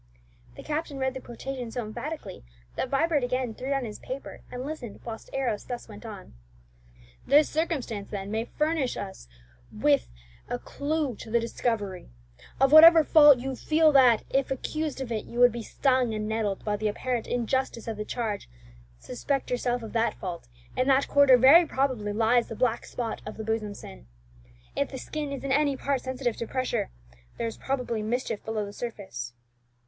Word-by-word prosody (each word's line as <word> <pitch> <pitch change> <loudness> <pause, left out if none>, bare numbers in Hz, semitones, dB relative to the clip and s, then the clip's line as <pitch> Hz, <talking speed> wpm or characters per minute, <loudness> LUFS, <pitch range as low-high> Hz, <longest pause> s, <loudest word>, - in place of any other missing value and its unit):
'" - - -27
The - - -9
captain 300 -1 -3
read 265 -1 0
the 260 - -7
quotation 250 0 -6
so 235 0 -4
emphatically 215 -1 -6 0.3
that - - -2
Vibert 295 0 +2
again 250 -1 -1
threw 255 +4 -6
down 275 -2 0
his 210 -2 -7
paper, 265 +2 -7
and 250 +1 -5
listened 275 -8 -6
whilst 225 -1 -7
Arrows 245 -6 -2
thus 245 -1 -6
went 215 +1 -10
on: 205 - -10 0.9
"'This 290 +3 +6
circumstance, 280 - -2
then, 200 -1 -5
may 220 +1 -1
furnish 300 -2 -1
us 190 - -7 0.4
with - - +2 0.4
a - - -1
clue 285 - -2
to - - -9
the 235 +1 +3
discovery: 220 - -2 0.5
of 270 +1 +4
whatever 320 +1 +10
fault 295 -3 +7
you 260 +2 -4
feel 310 +4 +3
that, 250 -5 +6
if 270 0 +1
accused 300 +2 -3
of 250 -3 -5
it, 220 -2 -2
you 235 - -9
would 245 0 +7
be 235 +1 -5
stung 255 -1 +1
and 215 0 -3
nettled 215 -3 -2
by 210 -1 0
the 215 +1 -1
apparent 240 +2 -2
injustice 245 -1 -1
of 225 -2 -3
the 210 - -3
charge, 215 -2 -3 0.5
suspect 270 - -3
yourself 245 -1 0
of 220 - -8
that 230 0 +1
fault, 175 - -6 0.3
in 255 - +1
that 270 0 +4
quarter 280 -3 +6
very 275 +8 +8
probably 255 -7 -1
lies 230 +3 +3
the 225 - -6
black 240 0 0
spot 235 -2 -4
of 215 - -8
the 220 - -5
bosom 215 -2 -2
sin. - - -11 0.7
If - - 0
the 265 - -6
skin 295 +2 -5
is 275 - -5
in 275 - -2
any 285 0 +2
part 275 -1 -1
sensitive 255 -3 -2
to 230 - -4
pressure, 255 -1 -1 0.5
there - - -2
is 225 - -3
probably 250 -4 -2
mischief 225 0 -2
below 220 -1 -2
the 200 - -9
surface.'" 190 - -6
245 Hz, 185 wpm, -27 LUFS, 220-270 Hz, 0.9 s, whatever